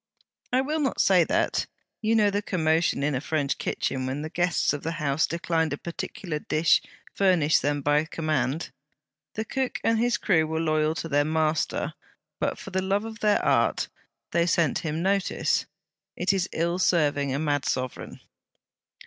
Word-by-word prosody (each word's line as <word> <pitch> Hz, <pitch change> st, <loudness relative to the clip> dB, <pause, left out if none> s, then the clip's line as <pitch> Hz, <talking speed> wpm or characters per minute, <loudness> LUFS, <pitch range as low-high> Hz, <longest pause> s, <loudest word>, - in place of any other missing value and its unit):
'I 255 Hz, +1 st, +3 dB
will 300 Hz, +4 st, -1 dB
not 275 Hz, -3 st, -1 dB
say 185 Hz, -3 st, +5 dB
that. -, -, 0 dB, 0.3 s
You 225 Hz, +1 st, +2 dB
know 210 Hz, -2 st, +4 dB
the 205 Hz, +1 st, 0 dB
commotion 160 Hz, -6 st, +1 dB
in 150 Hz, 0 st, +1 dB
a 130 Hz, -, -1 dB
French 150 Hz, -2 st, -1 dB
kitchen 130 Hz, -1 st, -2 dB
when 135 Hz, +3 st, -3 dB
the 155 Hz, -, -6 dB
guests 175 Hz, -3 st, +1 dB
of 145 Hz, -, -4 dB
the 165 Hz, -, -3 dB
house 150 Hz, -2 st, 0 dB
declined 165 Hz, -2 st, -1 dB
a -, -, -3 dB
particular 170 Hz, -1 st, -5 dB
dish 155 Hz, +2 st, +3 dB, 0.3 s
furnished 180 Hz, -6 st, +3 dB
them 145 Hz, 0 st, -1 dB
by 145 Hz, +2 st, +3 dB
command. 155 Hz, -2 st, -2 dB, 0.6 s
The 220 Hz, -, -2 dB
cook 265 Hz, +2 st, -2 dB
and 225 Hz, 0 st, +2 dB
his 240 Hz, -1 st, +2 dB
crew 160 Hz, -6 st, +2 dB
were 160 Hz, 0 st, -2 dB
loyal 155 Hz, -1 st, +1 dB
to 165 Hz, -, -4 dB
their 145 Hz, -2 st, +2 dB
master, 155 Hz, 0 st, 0 dB, 0.5 s
but, -, -, -1 dB
for -, -, -9 dB
the 190 Hz, 0 st, 0 dB
love 195 Hz, +3 st, 0 dB
of 225 Hz, 0 st, -8 dB
their 210 Hz, -1 st, +2 dB
Art, -, -, +2 dB, 0.4 s
they 170 Hz, 0 st, +2 dB
sent 170 Hz, -5 st, +2 dB
him 160 Hz, +1 st, -3 dB
notice. 195 Hz, 0 st, +1 dB, 0.5 s
It 185 Hz, +2 st, +1 dB
is 190 Hz, -1 st, 0 dB
ill 170 Hz, +2 st, -1 dB
serving 145 Hz, -6 st, +2 dB
a 135 Hz, -, 0 dB
mad 145 Hz, -2 st, 0 dB
sovereign.' 130 Hz, -1 st, -3 dB
160 Hz, 175 wpm, -26 LUFS, 150-190 Hz, 0.6 s, say